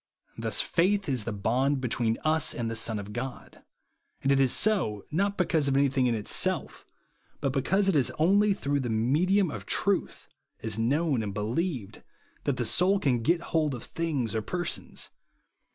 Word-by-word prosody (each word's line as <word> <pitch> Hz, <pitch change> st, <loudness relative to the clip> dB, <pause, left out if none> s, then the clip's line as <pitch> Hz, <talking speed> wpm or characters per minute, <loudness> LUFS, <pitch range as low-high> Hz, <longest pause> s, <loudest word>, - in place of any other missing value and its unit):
Thus -, -, 0 dB
faith 195 Hz, +3 st, +1 dB
is 125 Hz, -6 st, 0 dB
the 115 Hz, -, -2 dB
bond 125 Hz, +7 st, 0 dB
between 115 Hz, -2 st, 0 dB
us 155 Hz, -1 st, +2 dB
and 115 Hz, -2 st, -2 dB
the -, -, -3 dB
Son 115 Hz, -1 st, +1 dB
of 105 Hz, 0 st, -7 dB
God; 125 Hz, +2 st, -7 dB, 0.6 s
and 135 Hz, -, +2 dB
it 135 Hz, -, +4 dB
is 135 Hz, -2 st, +4 dB
so, 165 Hz, -, +1 dB
not 200 Hz, +5 st, 0 dB
because 165 Hz, -5 st, +1 dB
of 135 Hz, 0 st, +2 dB
anything 135 Hz, -2 st, +2 dB
in 120 Hz, -, +1 dB
itself, 105 Hz, -2 st, -1 dB, 0.5 s
but 135 Hz, -, -1 dB
because 190 Hz, +9 st, +1 dB
it 195 Hz, -, +2 dB
is 135 Hz, -4 st, +3 dB
only 200 Hz, +6 st, +4 dB
through 145 Hz, -7 st, -1 dB
the 125 Hz, -3 st, -3 dB
medium 155 Hz, -, +2 dB
of 100 Hz, -6 st, -8 dB
truth, -, -, 0 dB, 0.4 s
as 110 Hz, -1 st, -2 dB
known 140 Hz, +4 st, +1 dB
^.nd 105 Hz, -3 st, -4 dB
believed, 115 Hz, -, -3 dB, 0.4 s
that -, -, 0 dB
the -, -, -1 dB
soul 190 Hz, +3 st, +3 dB
can 125 Hz, -7 st, +1 dB
get 170 Hz, +8 st, +2 dB
hold 155 Hz, -4 st, +1 dB
of 120 Hz, -, -8 dB
things 150 Hz, -9 st, -2 dB
or 110 Hz, -, -1 dB
persons. 175 Hz, +9 st, -3 dB
135 Hz, 175 wpm, -28 LUFS, 115-170 Hz, 0.6 s, it